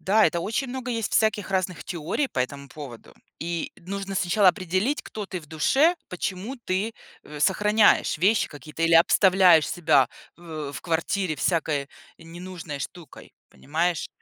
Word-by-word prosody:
Да, 210 Hz, +3 st, +4 dB
это 170 Hz, -, -1 dB
очень 225 Hz, +8 st, -2 dB
много 255 Hz, 0 st, -5 dB
есть 225 Hz, -3 st, -2 dB
всяких 215 Hz, -3 st, +1 dB
разных 185 Hz, -2 st, -1 dB
теорий 175 Hz, -, -2 dB
по -, -, -6 dB
этому 140 Hz, +2 st, -4 dB
поводу. 135 Hz, -6 st, -11 dB, 0.3 s
И 170 Hz, 0 st, -3 dB
нужно 195 Hz, +2 st, -6 dB
сначала 185 Hz, +2 st, +3 dB
определить, 185 Hz, -, 0 dB
кто 210 Hz, -2 st, -7 dB
ты 185 Hz, -2 st, -5 dB
в 155 Hz, -, -16 dB
душе, 270 Hz, -, +3 dB
почему 195 Hz, +7 st, -4 dB
ты, 215 Hz, -1 st, -2 dB, 0.3 s
э, 150 Hz, 0 st, -10 dB
сохраняешь 210 Hz, +1 st, +3 dB
вещи 205 Hz, +6 st, +3 dB
какие-то 155 Hz, +2 st, -8 dB
или 165 Hz, 0 st, +4 dB
обставляешь 180 Hz, -1 st, +5 dB
себя 140 Hz, -7 st, +3 dB, 0.3 s
в 155 Hz, -4 st, -7 dB
в -, -, -7 dB
квартире 165 Hz, 0 st, -1 dB
всякой 150 Hz, -4 st, 0 dB, 0.3 s
ненужной 165 Hz, -3 st, -8 dB
штукой, 170 Hz, -6 st, -9 dB, 0.2 s
понимаешь? 165 Hz, +3 st, -2 dB
180 Hz, 150 wpm, -25 LUFS, 160-205 Hz, 0.3 s, обставляешь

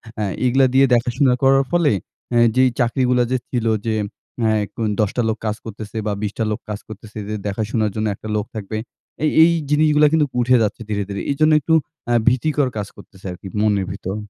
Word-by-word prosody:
অ্যা 105 Hz, -, -2 dB, 0.2 s
এইগুলা 130 Hz, +2 st, +4 dB
দিয়ে 135 Hz, +1 st, +6 dB
দেখাশোনা 125 Hz, +2 st, +2 dB
করার 135 Hz, +1 st, +5 dB
ফলেই, 160 Hz, -, +3 dB, 0.3 s
অ্যা 120 Hz, 0 st, +3 dB
যেই 130 Hz, 0 st, +5 dB
চাকরিগুলা 125 Hz, +1 st, +2 dB
যে 130 Hz, -, +2 dB
ছিলো 115 Hz, -3 st, 0 dB
যে 110 Hz, -1 st, 0 dB, 0.5 s
অ্যা 110 Hz, -1 st, +3 dB
এখন 110 Hz, +2 st, -4 dB
১০ 105 Hz, -2 st, +3 dB
টা 120 Hz, -, +1 dB
লোক 110 Hz, -, -1 dB
কাজ 105 Hz, 0 st, 0 dB
করতেসে 110 Hz, 0 st, -7 dB
বা 105 Hz, -, 0 dB
বিশটা 105 Hz, +2 st, -2 dB
লোক 105 Hz, -, -2 dB
কাজ 105 Hz, 0 st, -4 dB
করতেসে 110 Hz, 0 st, -9 dB
যে 110 Hz, -, -2 dB
দেখাশোনার 110 Hz, +1 st, -1 dB
জন্য 110 Hz, 0 st, -1 dB
একটা 110 Hz, -, -10 dB
লোক 105 Hz, 0 st, -1 dB
থাকবে, 110 Hz, +1 st, -4 dB, 0.5 s
এই, 155 Hz, -, +3 dB
এই 170 Hz, -, +5 dB, 0.2 s
জিনিসগুলা 150 Hz, 0 st, +4 dB
কিন্তুক 150 Hz, -4 st, +2 dB
উঠে 125 Hz, +1 st, +4 dB
যাচ্ছে 110 Hz, +2 st, -2 dB
ধীরে, 100 Hz, -1 st, -1 dB
ধীরে। 100 Hz, -, -4 dB
এই -, -, -1 dB
জন্য 155 Hz, 0 st, +5 dB
একটু 160 Hz, -, 0 dB, 0.3 s
অ্যা 120 Hz, -, +2 dB
ভীতিকর 135 Hz, +2 st, +2 dB
কাজ 100 Hz, -1 st, -3 dB
করতেসে 95 Hz, -1 st, -16 dB
আর 90 Hz, -, -8 dB
কী 95 Hz, -, -8 dB
মনের 100 Hz, -3 st, +2 dB
ভিতর। 95 Hz, 0 st, -5 dB
115 Hz, 205 wpm, -20 LUFS, 105-135 Hz, 0.5 s, দিয়ে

